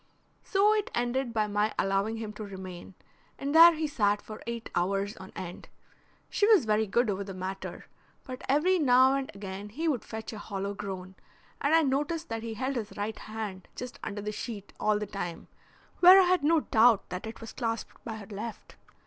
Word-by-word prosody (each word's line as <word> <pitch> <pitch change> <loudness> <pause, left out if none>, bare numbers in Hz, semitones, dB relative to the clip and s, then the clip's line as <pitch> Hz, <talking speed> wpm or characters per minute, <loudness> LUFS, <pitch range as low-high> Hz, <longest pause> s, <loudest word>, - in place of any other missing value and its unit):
So 410 +2 +3
it 425 -1 0
ended 245 +1 0
by 220 -2 +1
my 210 +1 0
allowing 195 +3 0
him 220 -1 -5
to 215 - -7
remain, 190 -2 -9 0.4
and 280 +1 -3
there 335 +1 +10
he 315 0 -1
sat 210 -8 +1
for 215 +1 -10
eight 235 -1 -5
hours 195 +3 0
on 190 0 -10
end. 175 -1 -7 0.6
She 410 - +2
was 425 - +6
very 215 0 +2
good 235 +5 +2
over 200 -1 -1
the 195 -1 -8
matter, 190 +1 -6 0.4
but 255 -1 -8
every 345 +7 +3
now 260 -2 +5
and 275 -1 -1
again 200 +1 -7
he 315 +10 -3
would 270 -8 0
fetch 220 +1 -7
a 215 - -7
hollow 200 -1 -4
groan, 190 -2 -6 0.5
and 290 +3 +3
I 325 - +5
noticed 295 +4 -1
that 225 0 -3
he 225 -1 -5
held 260 +4 -2
his 215 -3 -5
right 210 +2 -3
hand 215 -4 -6
just 250 0 -7
under 205 -1 -4
the 210 - -2
sheet 210 -2 -7
all 215 0 +2
the 210 - -3
time, 175 -4 -6 0.5
where 365 +2 +10
I - - +7
had 360 -3 +2
no 320 +1 +4
doubt 225 -3 +4
that 180 +4 -5
it 220 - -8
was 225 - -9
clasped 230 -2 -4
by 225 - -5
her 215 -2 -8
left. 215 +2 -8
220 Hz, 200 wpm, -29 LUFS, 200-270 Hz, 0.6 s, there